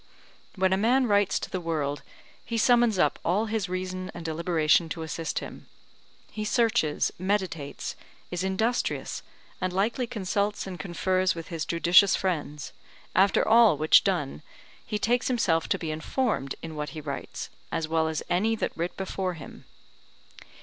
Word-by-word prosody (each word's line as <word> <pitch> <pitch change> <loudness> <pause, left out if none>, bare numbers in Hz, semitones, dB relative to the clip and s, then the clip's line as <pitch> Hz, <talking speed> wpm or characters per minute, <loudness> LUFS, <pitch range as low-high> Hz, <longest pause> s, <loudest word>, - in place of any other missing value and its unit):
When 190 -1 +2
a - - +2
man 250 +6 +3
writes 205 -3 +3
to - - -5
the 185 - -2
world, 150 -4 -2 0.4
he 230 - -3
summons 240 -2 +4
up 150 -5 +2
all 195 +6 +1
his 215 -4 -2
reason 185 0 -4
and 170 -1 -7
deliberation 165 0 +2
to 160 +1 -4
assist 160 0 -4
him; - - -6 0.6
he 215 - -4
searches, 215 - +1
meditates, 185 -6 -2 0.4
is 180 0 -2
industrious, 220 +6 -1 0.4
and 185 0 0
likely 225 +7 0
consults 205 -1 -1
and 185 -2 -7
confers 185 0 0
with 165 -1 -7
his 165 -3 -3
judicious 175 +4 +5
friends; 150 -6 -3 0.4
after 195 +2 +4
all 225 -7 +6
which 155 +1 +6
done 70 +2 -1 0.4
he 210 - -3
takes 240 +3 +1
himself 180 -10 +1
to - - +2
be 160 -2 -4
informed 155 - -1
in 165 -1 -6
what 150 0 -3
he - - -3
writes, 140 -2 -6 0.2
as 165 -1 -1
well 160 0 +1
as 160 -1 -2
any 205 +6 +1
that - - -3
writ 170 +2 -3
before 190 -1 -3
him. 150 -4 -11
185 Hz, 155 wpm, -27 LUFS, 160-210 Hz, 0.6 s, all